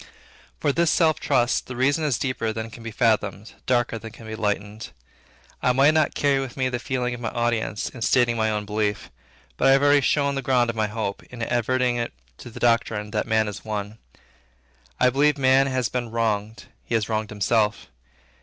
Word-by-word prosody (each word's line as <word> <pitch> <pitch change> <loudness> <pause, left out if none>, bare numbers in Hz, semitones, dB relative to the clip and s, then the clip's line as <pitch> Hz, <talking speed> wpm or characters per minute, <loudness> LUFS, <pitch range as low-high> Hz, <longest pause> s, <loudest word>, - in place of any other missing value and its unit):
For 145 - +1
this 170 +3 +2
self 160 -2 +3
trust, 120 0 +1
the 125 - -6
reason 140 +5 +1
is 145 -5 +1
deeper 125 -4 -2
than 110 +1 -5
can 115 - -11
be 115 - -6
fathomed, 105 -3 0
darker 120 -2 +1
than 115 0 -9
can 115 - -13
be 110 - -7
enlightened. 105 0 -3 0.7
I 125 - +3
might 140 +4 +5
not 155 -1 +2
carry 140 -1 +2
with 135 -1 -6
me 130 -1 +1
the 120 -1 -3
feeling 125 -1 -2
of 120 - -7
my 115 - -2
audience 115 -3 -1
in 120 - -9
stating 120 0 +3
my 110 -1 +1
own 105 -1 -2
belief. 105 0 -2 0.5
But - - +2
I 135 - +7
have 135 +1 +3
already 145 0 +5
shown 140 +1 +1
the 135 - -2
ground 120 -2 +2
of - - -15
my 110 -1 0
hope, 105 -2 -4
in 120 -1 -7
adverting 120 0 0 0.3
to - - -9
the 115 - -10
doctrine 115 -3 +1
that 105 - -1
man 110 -1 +2
is 105 - -7
one. 105 0 -5 1.0
I 125 0 +4
believe 145 +3 +3
man 135 0 +4
has 130 -3 0
been 120 -1 -3
wronged; 110 -1 -2 0.2
he 115 - -2
has 110 -2 0
wronged 110 -1 -2
himself. 105 +1 0
120 Hz, 200 wpm, -24 LUFS, 110-130 Hz, 1.0 s, I